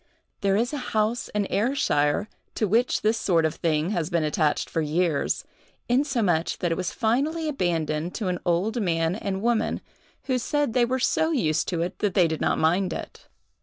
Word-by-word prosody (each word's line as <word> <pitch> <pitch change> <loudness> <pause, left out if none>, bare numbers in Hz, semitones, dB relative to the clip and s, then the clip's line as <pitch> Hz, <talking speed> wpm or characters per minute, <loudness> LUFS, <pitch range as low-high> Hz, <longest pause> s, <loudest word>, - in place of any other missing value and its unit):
There 195 -2 +2
is 240 +6 0
a 290 - -2 0.2
house 215 +3 +1
in 210 -1 -1
Ayrshire 205 - +1 0.3
to 215 - +1
which 230 +6 +1
this 220 +1 +2
sort 165 -4 +2
of 160 - 0
thing 160 +2 0
has 170 -5 -1
been 170 -3 +1
attached 150 0 +1
for 165 - -1
years, 155 0 0 0.4
insomuch 235 - +1
that 175 - -1
it - - +1
was 180 0 -2
finally 285 +8 0
abandoned 170 - -1
to 215 - -2
an 180 -1 -1
old 195 +7 0
man 165 -3 +1
and 195 -1 -3
woman, 235 -1 +1 0.4
who 260 -1 0
said 290 +3 0
that - - -7
they 245 -1 +4
were 255 +2 0
so 315 +5 +1
used 160 - +1
to 170 -2 -1
it 180 +2 -5
that 205 -3 0
they 180 -3 +5
did 160 -1 -3
not - - +1
mind 175 +3 +2
it. - - -8
195 Hz, 195 wpm, -25 LUFS, 165-235 Hz, 0.4 s, they